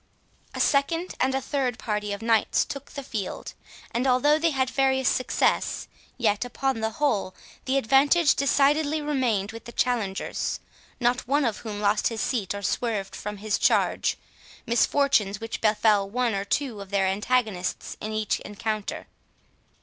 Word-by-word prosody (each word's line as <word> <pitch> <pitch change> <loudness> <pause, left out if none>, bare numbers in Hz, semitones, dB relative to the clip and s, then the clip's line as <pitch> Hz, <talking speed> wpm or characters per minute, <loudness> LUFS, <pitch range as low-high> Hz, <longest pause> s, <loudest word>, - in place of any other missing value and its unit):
A - - -4
second 330 +6 +1
and 265 +1 +2
a 270 - 0
third 260 -5 -1
party 210 -2 -3
of 200 +2 -5
knights 225 -2 +2
took 280 0 -7
the 280 - -6
field; 205 -7 -5 0.4
and 245 +3 0
although 290 +4 +4
they 330 +1 +3
had 265 -4 0
various 265 -1 +2
success, 255 - +1 0.3
yet, 210 -3 +1
upon 250 0 -2
the 220 0 0
whole, 220 -10 0 0.3
the 265 +1 +1
advantage 280 +6 +4
decidedly 290 +2 +2
remained 255 -9 0
with 230 +1 -10
the 235 - -8
challengers, 230 -7 -1 0.4
not 245 -1 +1
one 285 +2 +2
of 225 -3 0
whom 210 -3 -6
lost 205 +1 +2
his 225 -2 -3
seat 215 -6 -1
or 200 - -6
swerved 210 -2 -2
from 210 0 -6
his 210 0 -1
charge—misfortunes 235 -4 +1
which 225 0 -5
befell 210 -2 +3
one 245 +1 0
or 200 0 -2
two 240 -2 -2
of 195 - -9
their 200 -1 +1
antagonists 205 -1 -1
in 215 - -4
each 215 -1 -1
encounter. 210 0 -4
235 Hz, 155 wpm, -26 LUFS, 210-270 Hz, 0.4 s, although